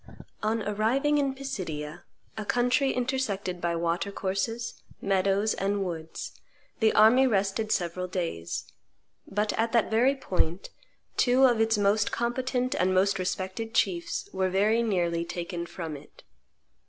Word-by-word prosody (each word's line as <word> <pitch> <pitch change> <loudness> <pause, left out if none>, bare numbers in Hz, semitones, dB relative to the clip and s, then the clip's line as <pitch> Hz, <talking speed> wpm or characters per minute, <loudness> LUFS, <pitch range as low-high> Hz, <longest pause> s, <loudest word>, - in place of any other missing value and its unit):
On 220 0 0
arriving 235 +9 +1
in 275 -2 0
Pisidia, 175 - -5 0.3
a 215 - -4
country 250 +5 +2
intersected 225 -8 -2
by 170 0 0
Water 170 +4 -1
courses, 200 +5 -3 0.2
meadows, 195 +2 +1
and 195 0 -1
woods, 160 -2 -5 0.5
the 220 -2 +4
army 245 +5 +6
rested 205 0 0
several 180 +1 -1
days; 165 - -3 0.6
but 210 +2 0
at 225 +1 +1
that 230 -2 +2
very 250 +5 +4
point 180 -8 -2 0.5
two 255 +2 +5
of 240 -3 +4
its 225 0 +3
most 205 +1 +2
competent 250 +1 -1
and 185 +1 +1
most 195 +1 +3
respected 190 +5 -3
chiefs 345 - 0
were 190 0 +1
very 210 +5 +3
nearly 175 -6 0
taken 170 0 -5
from 165 -4 -6
it. 145 +1 -14
205 Hz, 135 wpm, -28 LUFS, 185-240 Hz, 0.6 s, army